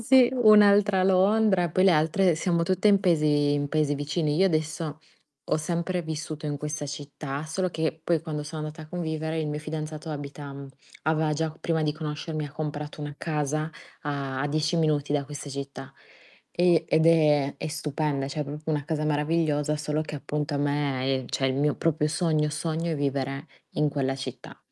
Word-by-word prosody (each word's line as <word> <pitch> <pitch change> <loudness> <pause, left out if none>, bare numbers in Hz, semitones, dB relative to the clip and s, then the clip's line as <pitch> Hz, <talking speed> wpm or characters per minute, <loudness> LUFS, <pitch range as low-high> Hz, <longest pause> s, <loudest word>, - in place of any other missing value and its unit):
Sì, 250 +2 +6
un'altra 205 -4 +6
Londra, 190 -1 +4
poi 185 +4 +3
le 190 - +7
altre 165 +3 +3
siamo 170 +1 +1
tutte 185 +4 +2
in 200 -1 +5
paesi 150 -5 +3
in 145 0 0
paesi 150 -1 +1
vicini. 150 +1 -1
Io 190 +3 +5
adesso 155 -2 -1 0.5
ho - - +2
sempre 170 +3 -1
vissuto 155 -1 -5
in 145 -1 -2
questa 150 0 -4
città, 145 0 -5
solo 185 +4 -1
che 160 0 -2
poi 165 -2 +1
quando 150 -3 -4
sono 155 +1 -6
andata 155 +1 -6
a 155 - -12
convivere 160 -2 -3
il 155 - -1
mio 150 0 -2
fidanzato 155 0 -5
abita 145 -1 -6
mhmm, 140 0 -8 0.3
aveva 155 0 +1
già 160 +1 -1
prima 160 -1 0
di 150 -1 +1
conoscermi 155 0 -4
ha 140 - -12
comprato 150 -1 -5
una 145 0 -5
casa 155 0 -1 0.3
a 140 -2 -3
a 145 - +1
10 155 +2 0
minuti 150 -3 +1
da 145 -1 +1
questa 145 0 -7
città, 140 0 -7 0.6
e 170 -2 +3
ed 160 +1 +3
è 150 -4 +4
è - - -3
stupenda, 150 -2 -2
cioè 150 +2 -4
è - - -1
proprio 150 +2 -5
una 145 -2 0
casa 155 -1 -1
meravigliosa, 150 0 +1
solo 150 +1 -1
che 155 -1 -5
appunto 150 +1 -3
a - - +1
me, 140 -2 0 0.2
ehm, 125 - -9
cioè 135 - 0
il 130 - +1
mio 145 +1 +2
proprio 155 -2 +1
sogno, 155 -1 +1
sogno 160 +2 -2
è 155 - -1
vivere 140 +1 -2 0.3
in 150 -1 +1
quella 135 -2 -1
città. 135 - -8
155 Hz, 190 wpm, -26 LUFS, 145-165 Hz, 0.6 s, le